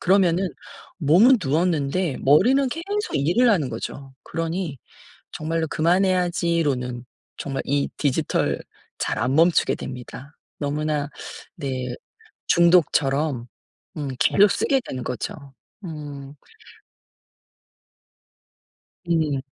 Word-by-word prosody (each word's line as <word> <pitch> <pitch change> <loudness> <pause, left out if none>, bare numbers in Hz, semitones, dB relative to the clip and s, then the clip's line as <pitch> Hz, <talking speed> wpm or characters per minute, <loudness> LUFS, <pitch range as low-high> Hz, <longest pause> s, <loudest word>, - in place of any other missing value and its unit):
그러면은 185 -1 +3 0.5
몸은 185 - +6
누웠는데 160 +1 0
머리는 245 - +4
계속 400 - -3
일을 175 - +3
하는 160 - +2
거죠. 135 -1 -7
그러니 165 -3 -3 0.6
'정말로 160 +1 -2
그만해야지.'로는 170 -8 +1 0.3
정말 135 -1 -3
이 140 +1 +1
디지털 140 -4 0 0.4
잘 - - -1
안 130 - 0
멈추게 165 +1 +4
됩니다. 130 +3 -9 0.2
너무나 150 0 -1 0.5
네 130 -3 -4 0.5
중독처럼 150 -6 +3 0.5
음 145 -3 -3
계속 205 +1 +5
쓰게 270 -1 +1
되는 130 -1 -5
거죠. 125 -1 -4 0.5
음. 145 -3 -8 2.8
음. 155 -5 +1
155 Hz, 205 characters per minute, -23 LUFS, 140-180 Hz, 2.8 s, 몸은